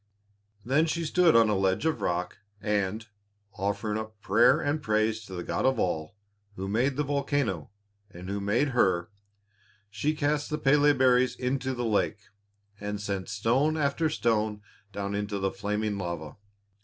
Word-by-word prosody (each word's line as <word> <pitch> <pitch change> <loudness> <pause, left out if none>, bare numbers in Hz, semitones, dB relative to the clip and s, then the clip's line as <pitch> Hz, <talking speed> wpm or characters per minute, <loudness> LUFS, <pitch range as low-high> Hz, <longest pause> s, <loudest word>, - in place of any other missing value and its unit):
Then 145 +6 +3
she 170 +1 -1
stood 170 +1 +4
on 115 -1 +6
a 105 - +1
ledge 95 +7 +1
of 160 - 0
rock, 90 0 -2 0.2
and, 105 +1 -1 0.5
offering 105 +2 -2
up 110 -1 -8
prayer 125 +7 +4
and 150 +1 -1
praise 110 -2 0
to 95 - -8
the 90 - -4
God - - -2
of 130 -1 +3
all, 80 -3 -2 0.4
Who 95 0 -4
made 120 +7 +1
the 150 - 0
volcano 140 - -1 0.4
and 90 -1 -10
Who 100 +1 -2
made 105 +9 +1
her, 95 -6 +1 0.8
she 145 +9 -1
cast 150 0 0
the 150 - -1
Pélé 145 0 +4
berries 130 -1 +4
into 130 0 -2
the 120 0 -2
lake, 105 -1 0 0.6
and 105 0 -4
sent 100 -2 -4
stone 120 +9 +1
after 155 +2 +1
stone 110 -6 0 0.3
down 100 0 -4
into 105 0 -2
the 95 0 -1
flaming 105 +1 -2
lava. 85 -4 -5
110 Hz, 160 wpm, -28 LUFS, 100-140 Hz, 0.8 s, on